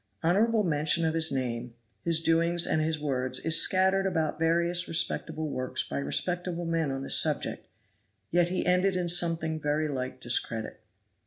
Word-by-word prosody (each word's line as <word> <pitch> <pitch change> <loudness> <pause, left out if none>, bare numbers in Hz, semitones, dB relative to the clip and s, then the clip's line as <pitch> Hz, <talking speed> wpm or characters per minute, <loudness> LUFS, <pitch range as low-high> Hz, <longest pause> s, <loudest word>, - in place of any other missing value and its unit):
Honorable 215 +6 +2
mention 155 0 +1
of 160 - 0
his 160 -1 +2
name, 120 -3 -4 0.3
his 165 -1 +1
doings 170 +1 +2
and 155 - 0
his 160 0 -1
words 130 -3 0
is 160 0 +5
scattered 190 +1 +2
about 160 -4 -2
various 170 +2 +1
respectable 160 -1 -1
works 130 -2 -3
by 70 - -4
respectable 175 - -2
men 165 -2 -1
on 135 0 -4
this - - +6
subject, - - -1 0.6
yet 175 0 +2
he 185 - -2
ended 180 +1 +2
in 180 -1 -2
something 165 -2 0
very 150 +1 -1
like 130 -3 -5
discredit. 115 -2 -2
165 Hz, 160 wpm, -28 LUFS, 145-175 Hz, 0.6 s, this